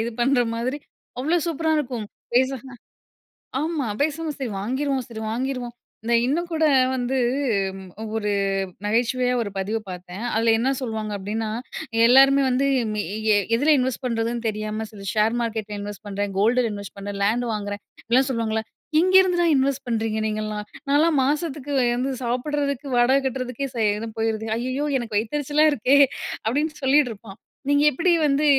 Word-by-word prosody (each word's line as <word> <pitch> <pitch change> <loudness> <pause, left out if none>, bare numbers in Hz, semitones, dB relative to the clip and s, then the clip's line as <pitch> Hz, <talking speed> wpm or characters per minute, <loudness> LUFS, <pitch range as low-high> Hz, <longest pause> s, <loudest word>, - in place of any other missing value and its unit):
இது 235 - -2
பண்ணுற 250 0 +3
மாதிரி 255 +5 -2 0.4
அவ்ளோ 320 +6 +1
சூப்பரா 320 0 0
இருக்கும். 245 -7 -3 0.3
பேசாம, 260 0 0 0.9
ஆமா 310 -6 -1
பேசாம 315 +2 0
சரி 265 -3 -3
வாங்கிருவோம் 260 +4 -1
சரி 220 -3 -7
வாங்கிருவோம், 250 0 -3 0.3
இத 235 - -1
இன்னும் 340 +7 -1
கூட 320 0 +2 0.3
வந்து 260 +1 -1 1.0
ஒரு 210 -1 -1 0.6
நகைச்சுவையா 245 +3 +1
ஒரு 205 - -4
பதிவு 210 +4 -1
பார்த்தேன், 180 +4 -7
அதில 225 +1 +3
என்ன 255 +3 +1
சொல்லுவாங்க 220 -3 -3
அப்டின்னா, 215 +3 -3 0.6
எல்லாருமே 270 +2 +6
வந்து 260 +2 +2 0.3
மி 210 - -1 0.3
எ - - +5 0.2
எதில 290 +6 +3
இன்வெஸ்ட் 260 +1 -1
பண்ணுறதுன்னு 230 -1 -1
தெரியாம, 215 +1 -3
சில 200 -2 -10
ஷேர் 220 +2 +2
மார்க்கெட்டில 215 -2 -3
இன்வெஸ்ட் 205 +1 -7
பண்ணுறேன், 200 0 -3
கோல்டுல 235 +4 +3
இன்வெஸ்ட் 200 -1 -8
பண்ணுறேன், 200 0 -5
லேண்ட் 235 +4 +1
வாங்குறேன், 205 -1 -4 0.2
அப்படிலாம் 255 +4 +2
சொல்லுவாங்கல்ல, 225 -3 -1 0.4
எங்கெருந்து 370 0 +5
தான் 335 -2 +3
இன்வெஸ்ட் 275 0 0
பண்றீங்க 220 -1 -1
நீங்கள்லாம், 215 -1 -3 0.3
நான்லாம் 295 +1 +4
மாசத்துக்கு 290 -1 -2 0.2
வந்து 260 +2 -1
சாப்பிடறதுக்கு, 280 +3 -1
வாடகை 245 +3 +5
கட்டுறதுக்கே 260 +1 -3
சரியா 215 0 0
போயிடுது, 220 0 -1
ஐயயோ 255 +5 -2
எனக்கு 230 -4 -4
வயிததெரிச்சலா 290 +6 +1
இருக்கே 265 +2 +3 0.5
அப்டின்னு 295 +7 0
சொல்லிட்டு 270 -1 +4
இருப்பா, 205 -1 -11 0.4
நீங்க 285 0 +4
எப்படி 335 +7 +2
வந்து 285 +1 +2
245 Hz, 145 wpm, -23 LUFS, 220-275 Hz, 1.0 s, எல்லாருமே